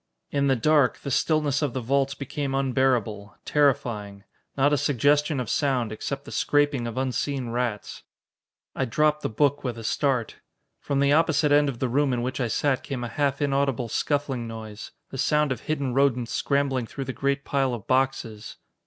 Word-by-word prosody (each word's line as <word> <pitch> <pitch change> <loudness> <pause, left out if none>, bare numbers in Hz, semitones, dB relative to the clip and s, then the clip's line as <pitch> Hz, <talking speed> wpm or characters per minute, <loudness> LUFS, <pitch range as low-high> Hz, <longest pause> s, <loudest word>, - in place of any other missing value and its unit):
In 140 -1 +1
the 135 - +3
dark, 145 +1 +3
the 140 - -5
stillness 150 0 +1
of 145 -5 -1
the 130 - -2
vaults 135 +3 0
became 140 0 -3
unbearable, 125 -7 0
terrifying. 110 -9 0 0.3
Not 145 +2 +3
a - - +5
suggestion 145 +2 +2
of 125 - -3
sound, 130 -6 0
except 135 +6 -5
the - - -9
scraping 145 -4 +1
of 115 - -6
unseen 130 0 -1
rats 120 -3 -3 0.4
" - - -67
I 135 - 0
dropped 150 +5 +1
the - - -2
book 140 +6 +1
with 125 -3 -3
a 115 - -7
start. 125 0 0 0.4
From 140 -1 -1
the 140 0 +4
opposite 155 -1 +3
end 145 0 +5
of 130 - -5
the 130 - -1
room 135 +2 +1
in 120 -1 -1
which 130 +2 -3
I 120 - +1
sat 135 +3 0
came 130 -3 -5
a 120 - -4
half 140 +3 0
inaudible 135 -4 0
scuffling 135 -2 -1
noise 110 -2 -8 0.2
the 135 - -6
sound 150 0 +2
of 125 - -2
hidden 140 -5 -2
rodents 125 -3 +2
scrambling 135 -4 0
through 135 - -6
the 130 - -4
great 140 +1 -1
pile 135 -3 0
of 110 - -10
boxes. 130 -5 -1
135 Hz, 190 wpm, -25 LUFS, 120-145 Hz, 0.4 s, a